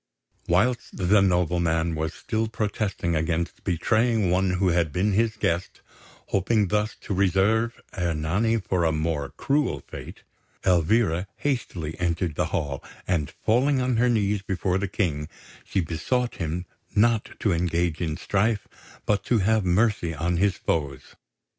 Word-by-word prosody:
Whilst 110 Hz, +8 st, +1 dB
the 100 Hz, +2 st, +4 dB
nobleman 85 Hz, -3 st, +1 dB
was 80 Hz, +1 st, -3 dB
still 110 Hz, -1 st, -2 dB
protesting 105 Hz, -6 st, -2 dB
against 80 Hz, +2 st, -1 dB
betraying 110 Hz, +2 st, +2 dB
one 95 Hz, 0 st, +2 dB
who 90 Hz, +1 st, +2 dB
had 85 Hz, -3 st, +1 dB
been 95 Hz, +7 st, +1 dB
his 110 Hz, +2 st, +2 dB
guest, 90 Hz, -4 st, -1 dB, 0.5 s
hoping 100 Hz, +1 st, +2 dB
thus 105 Hz, +2 st, 0 dB
to -, -, -4 dB
reserve 100 Hz, +5 st, +2 dB, 0.2 s
Ernani 90 Hz, +6 st, 0 dB
for 95 Hz, -4 st, -1 dB
a 80 Hz, -, +3 dB
more 75 Hz, -2 st, -1 dB
cruel 140 Hz, -1 st, 0 dB
fate, -, -, -10 dB, 0.4 s
Elvira 90 Hz, +1 st, +2 dB
hastily 90 Hz, -, -3 dB
entered 85 Hz, -1 st, 0 dB
the -, -, 0 dB
hall, 70 Hz, -3 st, -3 dB, 0.2 s
and, 80 Hz, -5 st, 0 dB
falling 130 Hz, -, +1 dB
on 125 Hz, -2 st, +1 dB
her 125 Hz, +2 st, +3 dB
knees 105 Hz, -3 st, +1 dB
before 95 Hz, -1 st, -1 dB
the 100 Hz, -, -1 dB
King, 80 Hz, -6 st, -1 dB, 0.3 s
she 95 Hz, -, -1 dB
besought 120 Hz, +10 st, -1 dB
him 85 Hz, +1 st, -3 dB, 0.3 s
not 110 Hz, +1 st, +2 dB
to 105 Hz, -, +1 dB
engage 85 Hz, -1 st, 0 dB
in 80 Hz, -2 st, -2 dB
strife, 100 Hz, +3 st, 0 dB, 0.4 s
but 105 Hz, -1 st, +1 dB
to 120 Hz, -, +2 dB
have 110 Hz, +1 st, +2 dB
mercy 90 Hz, -2 st, +1 dB
on 85 Hz, +3 st, 0 dB
his 100 Hz, +2 st, +2 dB
foes. 70 Hz, -5 st, -2 dB
95 Hz, 145 wpm, -25 LUFS, 85-110 Hz, 0.5 s, the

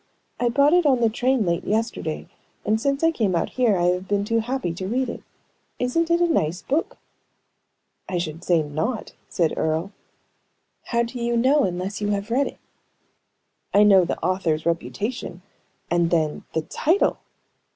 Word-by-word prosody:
"I 245 Hz, -, +2 dB
bought 280 Hz, +5 st, +4 dB
it 350 Hz, -3 st, +4 dB
on 260 Hz, -3 st, +4 dB
the 230 Hz, -2 st, +3 dB
train 250 Hz, 0 st, +1 dB
late 170 Hz, -1 st, 0 dB
yesterday, 215 Hz, -7 st, -2 dB, 0.4 s
and 220 Hz, +1 st, +1 dB
since 275 Hz, +3 st, 0 dB
I 325 Hz, -, +5 dB
came 215 Hz, -, 0 dB
out 165 Hz, -, 0 dB
here 235 Hz, -6 st, +2 dB
I 175 Hz, -, 0 dB
have 180 Hz, +1 st, -1 dB
been 200 Hz, 0 st, 0 dB
too 230 Hz, +2 st, +1 dB
happy 240 Hz, -6 st, -2 dB
to 185 Hz, +2 st, -5 dB
read 250 Hz, +4 st, 0 dB
it. -, -, -6 dB, 0.6 s
Isn't 325 Hz, +7 st, 0 dB
it 340 Hz, 0 st, +3 dB
a 345 Hz, -, +3 dB
nice 180 Hz, -, 0 dB
book?" 295 Hz, +5 st, -1 dB, 1.1 s
"I 180 Hz, -, -1 dB
should 165 Hz, -1 st, -4 dB
say 170 Hz, -3 st, +2 dB
not," 160 Hz, -, -3 dB, 0.2 s
said 165 Hz, -3 st, +1 dB
Earle. 160 Hz, +5 st, -1 dB, 0.9 s
"How 235 Hz, -1 st, +1 dB
do 235 Hz, +1 st, -6 dB
you 235 Hz, 0 st, 0 dB
know, 270 Hz, +4 st, +4 dB
unless 185 Hz, +3 st, -3 dB
you 205 Hz, -, 0 dB
have 205 Hz, +2 st, -2 dB
read 270 Hz, +4 st, +2 dB
it?" -, -, -9 dB, 1.2 s
"I 205 Hz, -, +7 dB
know 195 Hz, -3 st, +6 dB
the 170 Hz, -, -2 dB
author's 170 Hz, -4 st, 0 dB
reputation; 180 Hz, +2 st, -3 dB, 0.5 s
and 170 Hz, -1 st, +2 dB
then, 155 Hz, -3 st, 0 dB
the 160 Hz, -, 0 dB
title!" 335 Hz, -, +1 dB
210 Hz, 170 wpm, -23 LUFS, 175-255 Hz, 1.2 s, I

